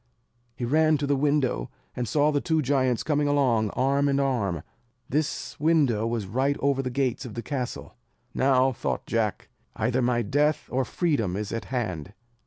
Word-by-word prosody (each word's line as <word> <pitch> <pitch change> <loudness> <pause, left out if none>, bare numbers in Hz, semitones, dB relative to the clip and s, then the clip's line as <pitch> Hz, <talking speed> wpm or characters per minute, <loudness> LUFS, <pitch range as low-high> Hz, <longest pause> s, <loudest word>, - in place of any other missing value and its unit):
He 120 - -3
ran 155 +4 +3
to 145 - -2
the 140 0 +2
window, 140 - +1 0.3
and 125 -1 -2
saw 150 +3 +2
the 145 -1 0
two 160 -2 +1
giants 130 -3 +1
coming 150 -1 +1
along 125 -7 +2
arm 140 +2 +2
in 140 0 +2
arm. 105 - 0 0.4
This 150 +2 -2
window 140 -8 +2
was 115 -3 -2
right 130 +8 0
over 140 -1 +1
the 130 - -3
gates 130 -1 -1
of 115 -5 -8
the 115 - -4
castle. 130 -4 -4 0.4
"Now," 130 0 +3
thought 120 - -3
Jack, - - -1 0.3
"either 125 +1 0
my 120 -1 +1
death 145 +7 +1
or 130 +1 +1
freedom 115 - 0
is 105 0 -4
at 115 - -3
hand." 100 - -4
130 Hz, 175 wpm, -26 LUFS, 120-145 Hz, 0.4 s, ran